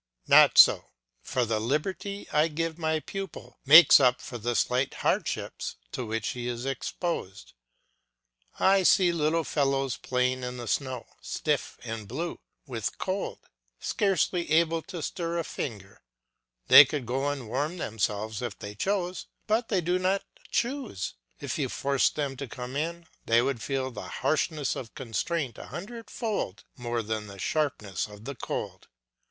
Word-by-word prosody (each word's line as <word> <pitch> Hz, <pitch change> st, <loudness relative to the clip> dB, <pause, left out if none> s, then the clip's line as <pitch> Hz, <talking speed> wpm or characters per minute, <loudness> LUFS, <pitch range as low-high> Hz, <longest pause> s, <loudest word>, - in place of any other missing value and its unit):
Not -, -, +7 dB
so; -, -, +8 dB, 0.4 s
for 125 Hz, -2 st, 0 dB
the 110 Hz, -1 st, 0 dB
liberty 185 Hz, -, -2 dB
I 150 Hz, +2 st, +4 dB
give 165 Hz, +1 st, -3 dB
my 160 Hz, -1 st, 0 dB
pupil 195 Hz, +3 st, -7 dB
makes 160 Hz, +3 st, +10 dB
up 125 Hz, -2 st, +4 dB
for 120 Hz, -, -7 dB
the 120 Hz, +2 st, -1 dB
slight 125 Hz, +3 st, +1 dB
hardships -, -, -2 dB, 0.2 s
to 130 Hz, -, -3 dB
which 110 Hz, -1 st, -2 dB
he 120 Hz, -1 st, -4 dB
is 120 Hz, +1 st, -4 dB
exposed. 135 Hz, -, -4 dB, 1.1 s
I 195 Hz, 0 st, +5 dB
see 180 Hz, -1 st, +5 dB
little 165 Hz, 0 st, +1 dB
fellows 135 Hz, -3 st, 0 dB
playing 125 Hz, 0 st, 0 dB
in 125 Hz, 0 st, -5 dB
the 120 Hz, -1 st, -6 dB
snow, 130 Hz, 0 st, -2 dB, 0.2 s
stiff -, -, -2 dB
and 115 Hz, -3 st, -5 dB
blue 160 Hz, -, -4 dB, 0.3 s
with 120 Hz, -7 st, -4 dB
cold, 190 Hz, +1 st, -3 dB, 0.4 s
scarcely 185 Hz, -4 st, 0 dB
able 165 Hz, +1 st, +3 dB
to 175 Hz, -5 st, -5 dB
stir 170 Hz, +1 st, -3 dB
a 170 Hz, -, 0 dB
finger. 100 Hz, -10 st, -6 dB, 0.7 s
They 145 Hz, -, +11 dB
could 145 Hz, -2 st, -4 dB
go 135 Hz, +4 st, -1 dB
and 140 Hz, -5 st, -4 dB
warm 145 Hz, +9 st, -2 dB
themselves 110 Hz, -, -2 dB
if 120 Hz, -, -4 dB
they 105 Hz, 0 st, -7 dB
chose, 185 Hz, -, -2 dB, 0.2 s
but 225 Hz, +2 st, +1 dB
they 195 Hz, -4 st, +1 dB
do 180 Hz, +2 st, +1 dB
not 190 Hz, +2 st, +1 dB, 0.3 s
choose; 240 Hz, -, -2 dB, 0.3 s
if -, -, -4 dB
you -, -, 0 dB
forced 140 Hz, -1 st, +1 dB
them 140 Hz, -3 st, -2 dB
to 140 Hz, -, -5 dB
come 125 Hz, +2 st, -7 dB
in 170 Hz, +3 st, -3 dB, 0.2 s
they 115 Hz, +1 st, +4 dB
would 130 Hz, -3 st, -1 dB
feel 135 Hz, 0 st, -2 dB
the 105 Hz, -4 st, -7 dB
harshness 150 Hz, -, -1 dB
of 120 Hz, -3 st, -8 dB
constraint 130 Hz, -, -2 dB
a -, -, -9 dB
hundredfold 215 Hz, -, -4 dB
more 120 Hz, -1 st, -2 dB
than 110 Hz, 0 st, -3 dB
the 100 Hz, 0 st, -10 dB
sharpness 110 Hz, -, -1 dB
of 105 Hz, +1 st, -13 dB
the 140 Hz, -, -4 dB
cold. 125 Hz, -, -5 dB
135 Hz, 155 wpm, -28 LUFS, 120-170 Hz, 1.1 s, They